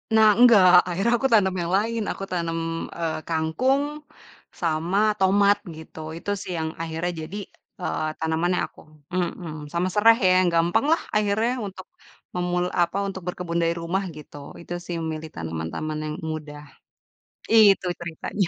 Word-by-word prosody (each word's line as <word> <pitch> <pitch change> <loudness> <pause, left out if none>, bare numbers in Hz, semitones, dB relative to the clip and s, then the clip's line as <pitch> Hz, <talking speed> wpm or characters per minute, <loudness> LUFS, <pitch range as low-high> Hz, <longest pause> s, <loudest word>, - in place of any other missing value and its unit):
Nah, 220 -1 +7
enggak, 185 -8 +7
akhirnya 195 +7 +1
aku 270 - +2
tanam 190 -4 +4
yang 170 +1 -3
lain 225 +2 -1
aku - - -6
tanam, 170 -2 -2 0.4
eee, 165 -2 -2
kangkung 170 - +1 0.8
sama 165 +3 0 0.2
tomat 200 +1 +4 0.2
gitu, 160 0 -11 0.2
itu 205 - -7
sih - - -6
yang 160 - -2
akhirnya 165 +2 -2 0.2
jadi, 200 +5 -7 0.4
eee, 80 - -2
tanaman 160 +2 0
yang - - 0
aku - - -21 0.3
mmm, 170 -4 -4
sama 175 +2 +1
sereh 225 +2 +6
ya - - +5
yang 185 -1 +3
gampang 175 +9 +2
lah 330 - +3
akhirnya 210 +3 +2 0.2
untuk 190 -1 -10 0.5
memul 180 0 0 0.2
apa, 175 +3 +1
untuk 190 -1 -6
berkebun 175 -1 -2
dari 165 0 +1
rumah 185 +4 -1
gitu. 150 - -12 0.3
Itu 170 - -15
sih 175 - -4
memilih 160 0 -4
tanaman 80 -1 -4
taman 155 0 -3
yang 150 0 -4 0.2
mudah. 150 -1 -7 1.1
Itu 190 - -2
ceritanya. 170 +3 -3
175 Hz, 155 wpm, -24 LUFS, 160-195 Hz, 1.1 s, Nah